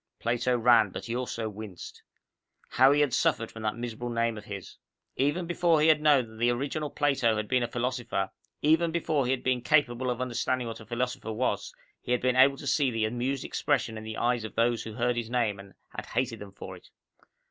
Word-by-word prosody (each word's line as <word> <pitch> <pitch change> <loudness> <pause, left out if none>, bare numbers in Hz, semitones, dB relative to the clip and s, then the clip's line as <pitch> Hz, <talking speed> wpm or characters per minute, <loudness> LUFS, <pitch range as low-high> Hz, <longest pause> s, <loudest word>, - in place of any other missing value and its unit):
Plato 120 +2 0
ran, 115 -3 +5
but - - -7
he 115 - -3
also 120 -3 -3
winced. 105 -4 -9 0.7
How 130 +2 +5
he 145 +1 +3
had 145 -4 +1
suffered 125 -4 +1
from 115 - -9
that 105 -1 -1
miserable 120 0 -5
name 115 -1 0
of 105 -1 -9
his! 100 -2 -8 0.4
Even 145 +6 0
before 170 -1 +2
he 155 +2 +4
had 155 -1 +4
known 145 -5 +4
that 110 - -14
the 120 +2 +2
original 140 +5 -2
Plato 135 -7 +1
had 105 -1 -2
been 130 +1 +2
a 120 - 0
philosopher, 120 -5 -2 0.3
even 160 +3 +4
before 155 -4 0
he - - +1
had 130 -1 -1
been 130 -1 +1
capable 130 -3 +2
of 125 -1 -2
understanding 125 0 -1
what 115 - -6
a 110 - -13
philosopher 120 -1 -3
was, 120 +4 -1 0.3
he 125 - -1
had 125 - +1
been 125 0 +2
able 135 +2 +5
to 140 - -9
see 140 0 +2
the 115 -2 0
amused 125 +4 -2
expression 120 -6 0
in 110 - -7
the 110 0 -6
eyes 120 -1 +1
of 110 - -7
those 115 0 +2
who 110 - -7
heard 120 +2 0
his 115 -1 -3
name, 115 -5 0
and 100 0 -13
had - - -7
hated - - -2
them 100 -1 -9
for - - -8
it. - - -17
120 Hz, 225 wpm, -28 LUFS, 115-135 Hz, 0.7 s, ran